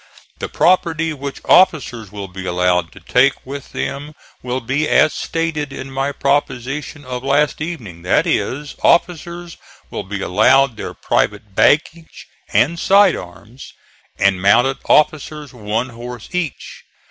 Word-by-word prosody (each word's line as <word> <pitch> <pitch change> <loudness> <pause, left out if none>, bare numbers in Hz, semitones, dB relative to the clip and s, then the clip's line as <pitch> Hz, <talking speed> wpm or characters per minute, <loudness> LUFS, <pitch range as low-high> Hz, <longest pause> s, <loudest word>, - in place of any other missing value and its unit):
The - - -4
property 165 -2 +2
which 140 -1 -7
officers 135 - +3
will 100 -2 -6
be 95 0 -8
allowed 90 -1 +1
to - - -13
take 130 +2 +2
with 140 +1 -8
them 145 +2 -5 0.3
will 125 +1 -3
be 135 +5 -1
as 155 - +4
stated 160 -3 -3
in 135 0 -7
my 135 +1 -1
proposition 140 +1 -2
of 125 0 -5
last 145 +3 +1
evening; 120 - -6
that 90 - +2
is, 145 +3 -2
officers 170 0 0 0.3
will - - -4
be 100 0 -6
allowed 125 +7 +3
their - - -7
private 105 -1 -1
baggage 155 - +1 0.3
and 165 +6 +2
side 195 -1 +5
arms, 95 +9 -11 0.4
and 95 -2 +2
mounted 120 +7 +3
officers 150 -1 +1
one 115 +2 -3
horse 120 -1 -9
each. 180 -7 -4
135 Hz, 135 wpm, -18 LUFS, 110-155 Hz, 0.4 s, side